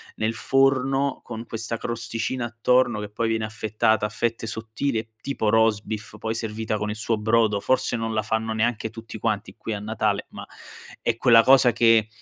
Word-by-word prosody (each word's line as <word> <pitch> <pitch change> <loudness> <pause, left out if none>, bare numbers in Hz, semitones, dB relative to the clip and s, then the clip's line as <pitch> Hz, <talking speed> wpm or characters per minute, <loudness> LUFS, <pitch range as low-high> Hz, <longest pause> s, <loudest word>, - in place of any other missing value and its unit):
nel 110 +1 -1
forno, 135 +2 +1
con 115 -1 -7
questa 115 0 -4
crosticina 115 +2 -3
attorno 120 0 +2
che 105 - -4
poi 115 +2 -2
viene 110 -1 0
affettata 110 0 0
a - - -2
fette 115 0 -2
sottili 115 +3 -3
e 110 0 -4
tipo 135 -6 -2
roast 110 -2 +3
beef, 110 0 -6
poi 110 0 -3
servita 110 -1 -3
con 105 +1 -3
il 105 - -3
suo 110 0 -1
brodo, 110 -2 +2
forse 130 -1 +1
non 115 -1 -2
la 110 - +1
fanno 110 +1 -2
neanche 110 0 0
tutti 115 0 -9
quanti 110 -1 -2
qui 110 -1 -5
a 100 - -4
Natale 105 -1 -1
ma - - -8 0.6
è 115 - 0
quella 115 -1 +6
cosa 130 -2 +6
che 115 -1 +4
115 Hz, 185 wpm, -24 LUFS, 110-115 Hz, 0.6 s, quella